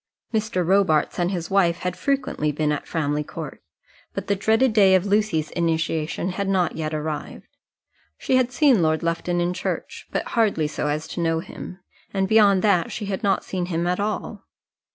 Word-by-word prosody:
Mr. 215 -5 0
Robarts 180 -5 +2
and 175 0 +1
his 180 -2 -4
wife 175 -4 +3
had 180 0 -2
frequently 255 - -1
been 150 +1 0
at 150 - -3
Framley 150 -2 -1
Court, 155 -1 -8 0.5
but - - -3
the 200 - +1
dreaded 220 +5 +2
day 195 -3 +6
of 185 0 +2
Lucy's 200 -7 +1
initiation 165 0 -1
had 195 +1 -2
not 185 -2 +1
yet 155 -1 -3
arrived. 155 0 -4 0.7
She 260 - 0
had 255 -1 +2
seen 255 - +4
Lord 160 0 +1
Lufton 170 +1 -1
in 175 +1 0
church, 185 - -4
but - - -2
hardly 215 -9 +2
so 150 0 -2
as 150 +2 -2
to 175 - -4
know 165 -1 +1
him, 180 +2 -9 0.3
and 195 0 +1
beyond 200 -3 +5
that 190 -5 +2
she 210 - -4
had 195 0 -3
not 200 -3 +1
seen 180 -2 -3
him 170 -1 -1
at 180 +2 0
all. 210 +1 -3
180 Hz, 185 wpm, -23 LUFS, 160-200 Hz, 0.7 s, day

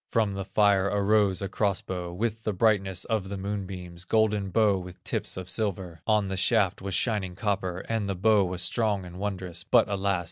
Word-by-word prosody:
From 110 -4 +1
the 95 -1 -4
fire 100 -2 +3
arose 100 -1 +2
a - - -1
cross 100 0 0
bow, 90 -2 -4
With 110 +4 -2
the 110 - -1
brightness 95 -2 +1
of 110 -5 -1
the 100 - -4
moonbeams, 95 -3 -5
Golden 105 0 +1
bow 100 0 +3
with 90 -1 -10
tips - - -2
of 95 -1 -6
silver; 90 -4 -3
On 105 -2 +3
the 95 0 -3
shaft 100 -1 +2
was 95 -1 -3
shining 100 -6 0
copper, 95 -3 -2
And 110 -3 -2
the 100 - -1
bow 105 +2 +4
was 90 0 -2
strong 105 -5 0
and 90 +1 -10
wondrous, 90 -4 -4
But 120 +3 +4
alas! 100 -2 0
100 Hz, 200 wpm, -27 LUFS, 95-105 Hz, -, bow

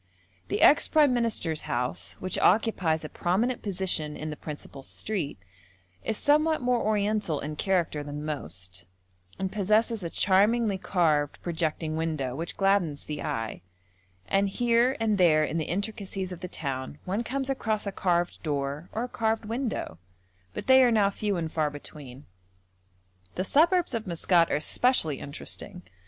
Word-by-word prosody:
The - - 0
ex 290 - +6
prime 295 -4 +4
minister's 220 -10 0
house, 120 -8 -1
which 185 - -2
occupies 180 -8 +2
a - - -3
prominent 220 +8 0
position 180 -6 0
in 155 0 -5
the - - -5
principal 145 -2 -8
street, 165 - -2 0.7
is 220 - -1
somewhat 305 +2 +3
more 245 -1 +1
Oriental 210 -6 0
in 150 +1 -5
character 170 -4 0
than 145 +1 -6
most, 90 - -4 0.5
and 190 -1 -2
possesses 215 +2 +1
a 170 - -4
charmingly 200 +3 +2
carved, 155 -7 +1
projecting 160 -2 -2
window, 155 -6 -2
which 165 +4 -4
gladdens 195 -7 +1
the 150 -1 -5
eye; 115 -1 -3 0.7
and 195 0 +2
here 240 +4 +2
and 215 -3 +1
there 155 -4 +5
in 155 +2 -2
the 155 - -2
intricacies 195 0 -3
of 180 - -7
the 180 - -5
town 135 -4 -5
one 200 +6 -1
comes 265 +2 -3
across 220 -6 -1
a 200 - -2
carved 175 -3 0
door 145 +1 -3
or 225 - -1
a - - -3
carved 225 -2 -1
window, 225 - -3 0.6
but - - -5
they 260 0 +7
are 245 - +5
now 210 -3 +3
few 205 -1 -2
and 165 -2 -3
far 155 -2 0
between. 145 -2 -10 1.1
The 185 - -1
suburbs 335 - +3
of 225 -3 -3
Maskat 170 0 +2
are - - +2
especially 155 - +2
interesting. 180 +5 -6
185 Hz, 155 wpm, -27 LUFS, 155-220 Hz, 1.1 s, they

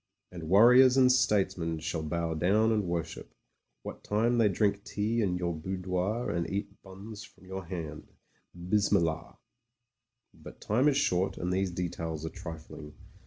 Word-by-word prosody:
And 85 -3 -8
warriors 125 +6 +7
and 130 -1 +6
statesmen 95 -9 +1
shall 80 +1 -3
bow 85 +1 -2
down 100 +8 +2
and 105 -3 0
worship, 85 -2 -5 0.5
what - - -8
time 115 +3 +1
they 110 -2 +4
drink 100 +1 0
tea 110 +3 -1
in 90 -4 0
your 85 -1 -2
boudoir 90 +6 -2
and 85 -1 -2
eat 100 +1 -5
buns 100 +3 -10
from 95 - -17
your 95 0 -6
hand. 80 -4 -7 0.5
Bismillah 90 -3 0 0.5
!" 120 0 -57
But - - -11
time 125 +7 +1
is 140 -2 +3
short, 95 -5 0
and 90 +1 -2
these 95 0 0
details 80 -2 -4
are - - -3
trifling. 80 -3 -10
95 Hz, 155 wpm, -29 LUFS, 85-105 Hz, 0.5 s, warriors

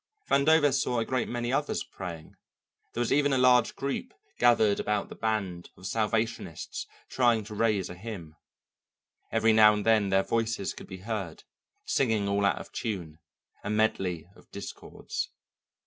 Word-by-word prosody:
Vandover 145 +1 +5
saw 125 -2 +1
a 115 - +1
great 130 -1 -1
many 120 +1 -2
others 145 +2 0
praying; 85 -4 -8 0.6
there 120 - -2
was 120 - +1
even 145 0 +3
a 135 - +3
large 125 -2 +4
group 140 - -4 0.2
gathered 110 -4 +4
about 105 -1 -1
the - - -9
band 100 -6 -2
of 90 - -12
Salvationists 110 -4 -2 0.2
trying 120 -4 +2
to 105 +1 -9
raise 105 -3 +1
a - - -7
hymn. 90 -5 -8 1.0
Every 115 0 +3
now 105 -1 +7
and 105 - -3
then 110 -3 +4
their 95 0 +3
voices 115 -3 -1
could - - -11
be 95 -1 -9
heard, 105 -8 -4 0.4
singing 110 -6 +1
all 100 0 +1
out - - +1
of - - -9
tune, 85 -8 -4 0.4
a 105 - -4
medley 95 -6 0
of - - -20
discords. 100 - -6
110 Hz, 160 wpm, -28 LUFS, 100-120 Hz, 1.0 s, now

